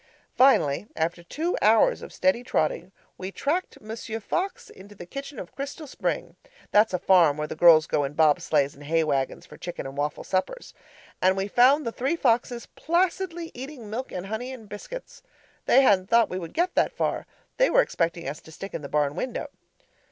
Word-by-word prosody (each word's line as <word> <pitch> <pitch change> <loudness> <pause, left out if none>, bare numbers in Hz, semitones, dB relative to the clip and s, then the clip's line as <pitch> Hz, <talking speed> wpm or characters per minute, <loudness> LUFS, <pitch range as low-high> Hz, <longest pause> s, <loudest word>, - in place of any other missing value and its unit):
Finally, 205 - +4
after 170 +2 -1
two 320 - -2
hours 225 - +4
of - - -9
steady 275 -3 +1
trotting, 170 -2 -1 0.3
we 185 +1 -5
tracked 325 - -2
Monsieur 225 +1 -6
Fox 365 - -3
into 200 +2 -14
the 175 - -9
kitchen 275 +8 -8
of 180 - -8
Crystal 285 +3 -6
Spring - - -3 0.4
(that's 210 +2 +5
a 180 - 0
farm 170 -5 +4
where 150 - -2
the - - -6
girls 160 -1 +7
go 145 - 0
in 140 +1 -3
bob 155 -1 +4
sleighs 145 -2 +1
and 145 +1 -13
hay 165 +2 +2
wagons 135 -4 -1
for - - -14
chicken 175 -4 -6
and 135 0 -7
waffle 145 +1 -2
suppers) 195 - -3 0.5
and 190 +1 +3
we 195 +1 -1
found 260 +7 +4
the 230 - -1
three 265 +8 -1
foxes 240 -4 +1
placidly 345 0 -1
eating 255 -4 -8
milk 255 +4 -4
and 180 0 -5
honey 220 +6 -4
and 225 -6 -10
biscuits. 485 - -9 0.5
They 270 - +6
hadn't 190 -6 +3
thought 230 0 +4
we 185 - -2
would 170 -3 -8
get 355 +2 +1
that - - +2
far; - - -1 0.3
they - - +4
were - - +5
expecting 170 -2 -2
us 145 +2 -5
to 160 - -15
stick 195 +5 -8
in - - -4
the 140 - -7
barn 145 -1 +1
window. 255 - -4
205 Hz, 195 wpm, -26 LUFS, 165-275 Hz, 0.5 s, girls